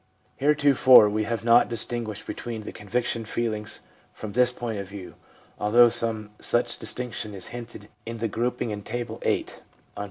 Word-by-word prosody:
Heretofore 140 -5 +6
we 110 0 -1
have 115 0 -3
not 115 +1 +5
distinguished 115 -2 -2
between 115 -2 -6
the - - -7
conviction 115 +3 -2
feelings 110 -1 -3 0.3
from 110 - -8
this 125 +2 +4
point 120 -4 -5
of 100 -1 -7
view, 100 -2 -9 0.5
although 120 +3 +5
some 110 -2 -1
such - - +1
distinction 115 -4 -2
is 95 - -4
hinted 120 -3 -9 0.2
in 115 0 -6
the 115 0 -1
grouping 120 +2 -2
in 105 -1 -5
Table 120 +3 -5
VIII. - - +1
on - - -12
p. - - -24
115 Hz, 165 wpm, -25 LUFS, 105-120 Hz, 0.5 s, Heretofore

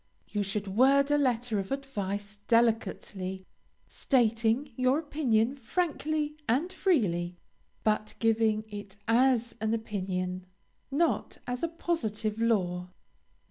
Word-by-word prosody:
You 205 - -2
should 200 +1 -2
word 270 +8 +4
a 290 - +5
letter 245 -5 +1
of 195 +3 -5
advice 205 -7 -3
delicately, 205 -5 +1 0.4
stating 235 +1 +1
your 255 +2 +3
opinion 275 -5 +1
frankly 300 +1 -1
and 295 +11 +1
freely, 180 - +1 0.5
but 215 0 0
giving 220 -1 +2
it 205 -2 -8
as 240 0 +3
an 220 +1 +1
opinion, 185 -4 -3 0.4
not 320 +5 0
as 245 0 -3
a 335 - +1
positive 225 -11 -2
law. 180 -6 +1
225 Hz, 110 wpm, -29 LUFS, 205-270 Hz, 0.5 s, a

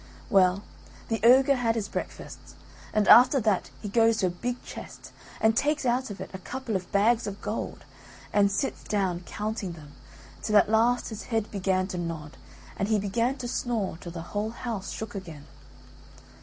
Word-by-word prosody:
Well, 190 -1 +4 0.5
the 225 -1 0
ogre 265 +3 +6
had 230 -2 +1
his 215 -3 -2
breakfast, - - -6 0.5
and 215 -1 +1
after 255 +3 +8
that 205 -4 +1
he - - -3
goes 225 +1 +3
to 190 - +1
a - - +2
big 240 +8 -4
chest - - -10 0.3
and 220 0 +3
takes 295 +3 +1
out 250 +1 +1
of 200 - -7
it - - -7
a 190 - -6
couple 250 +2 -4
of 185 -1 -4
bags 220 +3 +3
of 200 0 -5
gold 215 +1 -5 0.5
and 200 -1 +4
sits 270 +7 -2
down 190 -4 0
counting 210 -4 -4
them 150 -3 -13 0.5
till 215 -1 +3
at 205 - +4
last 235 +3 +3
his 220 -2 -7
head 225 -3 -2
began 190 -2 0
to 180 - -4
nod 160 -3 -5 0.4
and 195 - 0
he 215 0 +2
began 230 +6 0
to 250 -2 -5
snore 225 -8 -2
till 170 - -7
the 165 -1 -6
whole 210 +1 -1
house 225 -4 -5
shook 220 -1 -6
again. 165 -7 -8
215 Hz, 185 wpm, -27 LUFS, 190-235 Hz, 0.5 s, after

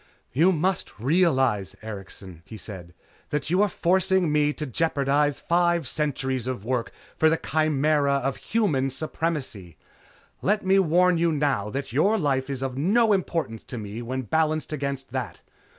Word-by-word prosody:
"You 165 +8 +4
must 185 +3 -1
realize, 130 - +2
Erikson," 95 -4 -9
he 110 - -10
said, 90 -5 -9 0.3
"That 150 +2 -2
you 185 +3 +3
are 210 - +3
forcing 185 -1 +2
me 150 0 +3
to 150 - -5
jeopardize 145 0 +1
five 170 0 +1
centuries 130 -4 -2
of 125 -6 -4
work 125 -1 -1 0.2
for 160 - +4
the 165 - +2
chimera 150 -2 +1
of 135 -1 -1
Human 155 -13 0
Supremacy. 135 - -3 0.6
Let 205 +1 +1
me 190 +1 +4
warn 180 0 +3
you 170 0 +2
now 140 -9 0
that 135 +1 -5
your 200 - +3
life 135 -6 0
is 135 -1 -3
of 130 0 -3
no 215 +7 +3
importance 165 - -2
to 125 - -6
me 105 +1 -6
when 130 +2 -3
balanced 155 +5 0
against 140 -3 -3
that. 125 -8 -4
145 Hz, 155 wpm, -25 LUFS, 130-170 Hz, 0.6 s, You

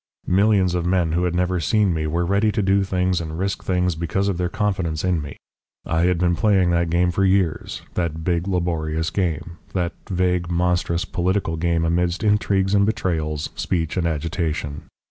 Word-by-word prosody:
Millions 95 -1 +3
of 90 -1 0
men 90 -2 +1
who 90 +2 +1
had 90 -1 -1
never 90 0 +1
seen 95 +5 +2
me 80 -1 -1
were 85 +3 0
ready 100 +4 +2
to 105 0 -1
do 95 +1 +3
things 90 -2 0
and 80 -1 -5
risk 95 +2 -2
things 90 -1 +1
because 85 +5 -1
of 90 -3 -2
their 90 -1 0
confidence 90 -6 -1
in 90 -3 +1
me. 70 -1 -8 0.5
I 80 +1 +1
had 90 -1 +2
been 85 0 +2
playing 95 0 +3
that 85 -1 +1
game 90 +1 +2
for 95 - 0
years, 95 -4 0
that 80 -2 -2
big 85 +1 0
laborious 80 -3 -1
game, 85 -2 -2
that 90 -2 -1 0.2
vague, 90 -2 0
monstrous 90 0 0
political 95 -1 -1
game 85 0 0
amidst 85 +4 0
intrigues 100 -2 +2
and 100 -1 +4
betrayals, 80 -8 -1
speech 80 -3 -2
and 90 -3 0
agitation. 80 -2 -3
90 Hz, 185 wpm, -22 LUFS, 85-95 Hz, 0.5 s, and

